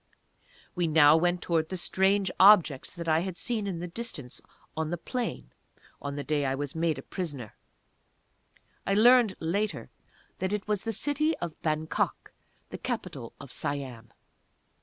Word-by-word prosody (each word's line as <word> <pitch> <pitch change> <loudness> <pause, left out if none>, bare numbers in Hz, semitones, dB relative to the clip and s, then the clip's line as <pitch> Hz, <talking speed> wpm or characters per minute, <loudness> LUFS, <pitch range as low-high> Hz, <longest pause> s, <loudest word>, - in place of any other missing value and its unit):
We 175 -2 0
now 150 -1 +7
went 175 +2 +1
towards 160 -2 +1
the 185 - -3
strange 190 +2 +2
objects 185 -9 +6
that 170 -2 -8
I 160 0 +4
had 180 0 -4
seen 220 -4 -2
in 185 -3 -3
the 175 +1 -5
distance 170 - -5 0.3
on 160 -1 -2
the 175 - -2
plain, 195 - -4 0.5
on 140 0 -4
the 145 - -4
day 145 +1 0
I 135 -1 0
was 145 0 -4
made 160 -3 0
prisoner. 145 - -5 1.3
I 195 - 0
learned 235 -2 +6
later 200 +6 -2 0.5
that 190 +2 -1
it 210 -1 -3
was 210 -1 -1
the 225 - 0
city 295 +7 0
of 170 -3 -6
Bangok, 155 -1 -1 0.4
the - - -6
capital - - -5
of - - -10
Siam. 130 -5 -4
170 Hz, 155 wpm, -28 LUFS, 150-200 Hz, 1.3 s, now